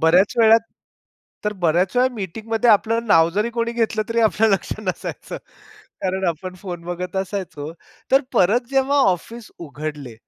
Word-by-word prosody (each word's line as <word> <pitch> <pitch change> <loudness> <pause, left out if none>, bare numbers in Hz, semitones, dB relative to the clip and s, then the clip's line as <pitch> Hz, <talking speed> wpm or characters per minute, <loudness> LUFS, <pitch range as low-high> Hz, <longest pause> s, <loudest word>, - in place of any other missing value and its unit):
बऱ्याच 175 +5 +4
वेळा 225 -1 +7 0.9
तर 210 - 0
बऱ्याच 175 +6 +2
वेळा 255 +1 +4
मीटिंगमध्ये 225 +4 -1
आपलं 225 +2 +2
नाव 165 -5 +5
जरी 210 +6 -1
कोणी 235 0 -2
घेतलं, 225 -2 0
तरी 230 0 +1
आपलं 220 0 +3
लक्ष 195 -3 0
नसायचं. 185 -4 -5 0.7
कारण 190 0 -1
आपण 180 +3 -4
फोन 175 -4 -6
बघत 180 +2 -5
असायचो, 185 -6 -4 0.4
तर 270 - +6
परत 205 +7 +3
जेव्हा 270 +1 +2
ऑफिस 225 +6 -6
उघडले, 150 -5 -7
195 Hz, 145 wpm, -21 LUFS, 175-230 Hz, 0.9 s, वेळा